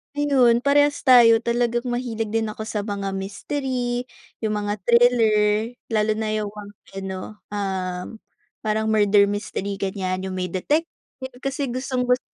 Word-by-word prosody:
Ayun, 260 -5 +3
parehas 290 +1 +3
tayo 235 -4 +7
talagang 240 0 0
mahilig 230 -3 -3
din 225 0 0
ako 215 +1 -6
sa 215 -1 -3
mga 200 -2 -3
mistery, 245 +5 -3 0.3
yung 215 -2 -1
mga 205 0 -2
thriller, 225 -2 +3 0.2
lalo 215 -1 +2
na 220 0 -2
yung 215 -1 -2 0.4
ano, 190 -1 -5 0.3
um, 190 -3 -3 0.6
parang 220 0 0
murder 205 -1 +4
mystery 200 -1 -3
ganyan 190 -1 -3
yung 190 -1 -4
may 180 0 -1
detective, 295 - 0 0.6
kasi 275 +1 -2
gustong 255 0 -2
gusto 250 +1 +2
220 Hz, 135 wpm, -23 LUFS, 205-245 Hz, 0.6 s, tayo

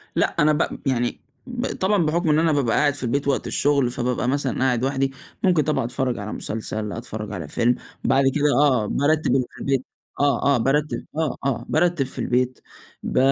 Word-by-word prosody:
لأ - - +1
أنا 150 +1 +5
ب 150 - -1
يعني 120 -3 0 0.3
ب 245 0 -3
طبعًا 190 -2 +1
بحكم 165 +2 +1
إن 150 +1 +4
أنا 165 0 +3
بابقى 135 -6 +1
قاعد 145 -1 +3
في 135 - -6
البيت 140 +4 -1
وقت 140 - 0
الشغل، 140 -3 +2
فبابقى 125 0 -1
مثلًا 135 -1 0
قاعد 125 -2 +1
لوحدي، 135 0 0 0.3
ممكن 175 -5 +4
طبعًا 150 -6 0
أتفرج 125 0 -1
على 105 +1 -5
مسلسل، 110 -1 -4
أتفرج 105 0 -6
على 85 -7 -5
فيلم، 120 +10 +2 0.3
بعد 135 +1 +3
كده 150 0 +1 0.2
آه، 130 -7 +3
بارتّب 155 +6 +1
اللي 130 -2 +2
في - - -15
البيت 135 -2 0 0.3
آه، 140 0 +2
آه، - - +2
بارتّب 145 +5 0
آه، 160 -3 0
آه، 135 -5 -1
بارتّب 170 -2 +2
في 130 - -9
البيت 125 +1 0 0.4
ب - - -3
135 Hz, 195 wpm, -23 LUFS, 125-150 Hz, 0.4 s, أنا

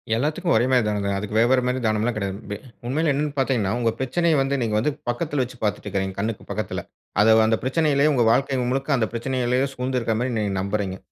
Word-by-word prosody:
எல்லாத்துக்கும் 155 +8 0
ஒரே 120 - +3
மாரி 125 -2 +4
தானங்க. 100 -1 -1
அதுக்கு 105 +1 -5
வேற 115 - +5
வேற 130 -1 +4
மாரி 125 +1 0
தானம்லாம் 110 +2 +1
கிடையாது. 100 -2 -3
வெ 105 - -3 0.3
உண்மையில 155 +4 +1
என்னன்னு 145 +1 -1
பார்த்தீங்கன்னா, 125 -7 +1
உங்க 115 -1 +2
பிரச்சனைய 160 +6 +1
வந்து 135 +1 0
நீங்க 110 -2 0
வந்து 135 +7 +1 0.2
பக்கத்துல 145 +3 -1
வச்சு 125 +1 -9
பார்த்துட்டுருக்கீங்க. 95 -2 -2
கண்ணுக்கு 110 +1 -3
பக்கத்துல. - - -3 0.4
அத 110 +1 +6
அந்த 110 0 +2
பிரச்சனையிலேயே 145 +1 +2
உங்க 125 -3 +3
வாழ்க்கை 135 +2 +1
முழுக்க 135 +2 -2
அந்த 110 -3 +1
பிரச்சனையிலேயே 125 +1 0
சூழ்ந்து 130 +1 -2
இருக்க 115 -1 -1
மாரி 125 +1 -1
நீங்க 105 -2 -1
நம்புகிறீங்க. 100 -1 -2
120 Hz, 200 wpm, -23 LUFS, 110-135 Hz, 0.4 s, அத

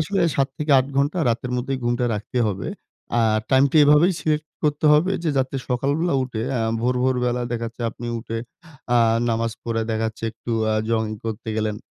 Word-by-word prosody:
আসলে 175 +6 0 0.2
৭-৮ 135 -1 +2
ঘন্টা 145 +6 +1
রাতের 120 +2 -1
মধ্যেই 130 +2 -2
ঘুমটা 120 +1 +1
রাখতে 105 +4 -4
হবে। 95 -3 -3 0.5
আ - - +4 0.3
টাইম 135 0 +5
টা - - +1
এভাবেই 150 +6 +5
সিলেক্ট 155 0 -1 0.2
করতে 150 +1 0
হবে। 170 +6 +3
যে, 165 - 0
যাতে 130 +1 -1
সকালবেলা 140 +6 0
উঠে 120 -4 -4 0.2
আ - - 0 0.2
ভোর, 125 +2 +1
ভোর 130 0 +2
বেলা 125 0 0
দেখা 115 -1 -2
যাচ্ছে 115 +1 -8
আপনি 120 +1 -8
উঠে 115 0 -5 0.6
আ - - +5 0.3
নামাজ 115 0 0
পড়ে, 115 -1 -1
দেখা 110 0 0
যাচ্ছে 110 - -13
একটু 115 +1 -8 0.2
আ - - +1
জগিং 110 -1 0
করতে 110 0 -4
গেলেন। 105 -1 -1
125 Hz, 185 wpm, -22 LUFS, 115-145 Hz, 0.6 s, টাইম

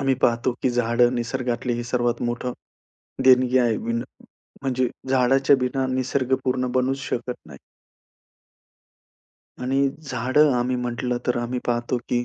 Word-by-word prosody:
आम्ही 135 -1 +2
पाहतो 120 +1 +2
की 130 - +2
झाडं 120 +1 +2
निसर्गातले 120 0 -2
हे 120 - -3
सर्वात 120 -1 -1
मोठं 120 +1 -2 0.7
देणगी 130 0 +5
आहे. 120 -3 +2
बिना 115 +1 -2 0.6
म्हणजे 130 -2 0 0.2
झाडाच्या 135 +2 +4
बिना 130 +1 -1
निसर्गपूर्ण 130 -1 0
बनूच 130 +2 +1
शकत 125 +1 -3
नाही. 70 -3 -12 2.0
आणि 135 +2 +2
झाडं 135 +2 +2
आम्ही 125 +1 0
म्हटलं 125 0 -2
तर 125 - +1
आम्ही 120 +1 -2
पाहतो, 120 +1 0
की 120 0 0
125 Hz, 125 wpm, -23 LUFS, 120-130 Hz, 2.0 s, देणगी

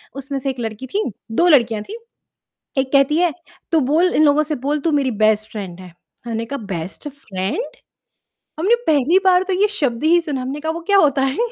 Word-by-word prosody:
उसमें 275 0 -5
से 270 - -2
एक 260 - -10
लड़की 225 +3 -5
थी, 410 - -1 0.3
2 340 +10 +3
लड़कियाँ 235 -8 +3
थी। 435 - -8 0.8
एक 265 0 0
कहती 275 +2 +4
है, 350 -2 +2 0.4
"तू 325 - +4
बोल 315 +7 +2
इन 310 - +4
लोगों 295 +1 +4
से 305 +1 -2
बोल 295 +1 0
तू 325 +2 0
मेरी 280 -3 +1
बेस्ट 215 0 +2
फ्रेंड 190 -4 -7
है।" 180 -2 -12 0.3
मैंने 230 -1 -3
कहा, 280 +4 -5
"बेस्ट 195 - -6
फ्रेंड? 260 - -5 0.8
हमने 400 +8 +4
पहली 305 +4 +4
बार 365 -1 +5
तो 380 - -3
ये 420 - +4
शब्द 285 - -2
ही 340 +2 +5
सुना 290 -5 -3
है, 255 - -5
हमने 280 +3 -4
कहा 315 +1 -2
वो 335 - -6
क्या 400 - +6
होता 280 -6 +3
है?" 270 +1 -1
280 Hz, 215 wpm, -19 LUFS, 235-320 Hz, 0.8 s, क्या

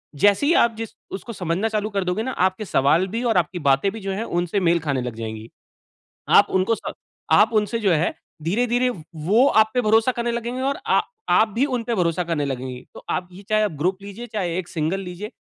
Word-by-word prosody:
जैसे 205 - +3
ही 330 - +4
आप 230 -1 0
जिस 225 -1 -6 0.2
उसको 225 +4 -6
समझना 180 +3 -1
चालू 215 -1 -1
कर 200 -2 -1
दोगे 180 +5 -1
न, - - -5
आपके 190 -2 0
सवाल 165 +3 +2
भी 230 +5 -3
और 225 -6 +2
आपकी 175 +1 0
बातें 135 +9 +3
भी 225 - -7
जो 195 -1 -4
है 205 +4 -2
उनसे 175 +2 -1
मेल 170 -1 +3
खाने 140 -5 -1
लग 125 -2 -5
जाएँगी। 110 0 -6 0.8
आप - - +7
उनको 190 +5 +2
स - - -6 0.4
आप 220 +2 +5
उनसे 215 +2 +1
जो 200 - +2
है 160 +1 +1 0.3
धीरे-धीरे 245 +8 +1
व 190 -10 -8 0.2
वो 230 +8 +5
आप 220 0 +3
पे 250 - +3
भरोसा 225 +3 +3
करने 235 0 -2
लगेंगे 240 +2 -3
और 275 +1 0
आ - - +4 0.3
आप 220 - +5
भी 250 - +2
उन 255 -4 -1
पे 235 +1 -2
भरोसा 175 -2 +1
करने 165 -4 -1
लगेंगी। 130 -2 -4
तो - - -11
आप 180 - -2
ये 195 +3 -12
चाहे 215 -1 +2
ग्रुप 185 +6 -1
लीजिए 205 +4 -8
चाहे 180 -5 -2
एक 175 - -5
सिंगल 165 +3 -1
लीजिए 190 +4 -7
195 Hz, 225 wpm, -22 LUFS, 170-225 Hz, 0.8 s, आप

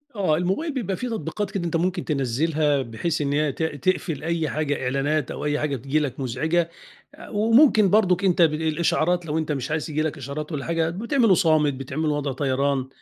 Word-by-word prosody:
آه. 170 -6 +1
الموبايل 195 - -1
بيبقى 200 -8 -2
في 250 - -4
تطبيقات 210 -3 -3
كده 195 -3 -3
أنت 165 - -2
ممكن 180 +2 0
تنزّلها، 145 +1 +1
بحيث 130 +7 -3
إن 140 0 0
هي 150 -1 +1
ت 160 - -4
تقفل 160 0 -1
أي 165 -2 -1
حاجة 145 -2 -2
إعلانات 140 +3 0
أو - - -5
أي 150 0 0
حاجة 150 -2 -1
تييجي 135 +5 -1
لك 140 -3 -3
مزعجة. 160 +7 0 0.5
آآ، - - -12
وممكن 220 0 +4
برضه 185 -3 +4
أنت 180 -2 +3
ب 160 -2 +5
الإشعارات 160 +2 0
لو 155 0 -2
أنت 155 -1 -2
مش 135 0 -3
عايز 155 0 -2
ييجي 155 0 -1
لك 155 -1 -2
إشعارات 145 +4 -6
والّا 140 -3 -4
حاجة 165 -1 0
بتعمله 230 - +2
صامت، 155 -5 +3
بتعمله 135 +4 -2
وضع 145 -1 -2
طيران، 135 0 0
155 Hz, 200 wpm, -24 LUFS, 140-175 Hz, 0.5 s, ب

